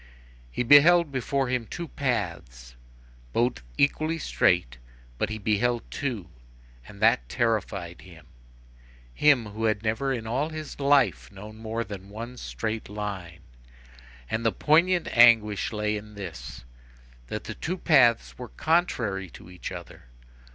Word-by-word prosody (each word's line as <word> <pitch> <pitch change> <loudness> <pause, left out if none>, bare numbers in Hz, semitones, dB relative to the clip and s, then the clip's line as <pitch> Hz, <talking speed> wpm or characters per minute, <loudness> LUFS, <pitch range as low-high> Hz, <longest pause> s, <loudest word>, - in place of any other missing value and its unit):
He 90 - -2
beheld 155 +5 +6
before 135 +1 -1
him 125 -2 -2
two 170 -1 -6
paths, 85 - -4 0.6
both 120 - 0 0.2
equally 155 +3 +1
straight, 90 - +1 0.4
but 105 - 0
he 110 - -4
beheld 110 +3 0
two; 120 -10 -3 0.6
and 100 - -13
that 115 +3 +3
terrified 100 -7 -2
him; 85 -4 -15 0.9
him, 140 - +4
who 110 +2 -3
had 110 -1 0
never 115 +5 -1
in 120 -4 -3
all 130 +7 -1
his 155 -2 -8
life 125 - +2
known 105 +3 -11
more 110 +1 -3
than 100 -2 -9
one 115 +4 -8
straight 100 - -4
line. 100 -5 -6 0.9
And, 110 +1 -2
the 115 - +3
poignant 170 +6 +3
anguish 115 -4 +5
lay 105 -1 -1
in 105 0 -11
this, 85 -15 -8 0.6
that - - -5
the - - -6
two 180 +3 -4
paths 125 -11 +3
were 125 -2 -7
contrary 115 - 0
to 90 - -13
each 90 0 -7
other. 85 -7 -10
110 Hz, 135 wpm, -26 LUFS, 100-135 Hz, 0.9 s, beheld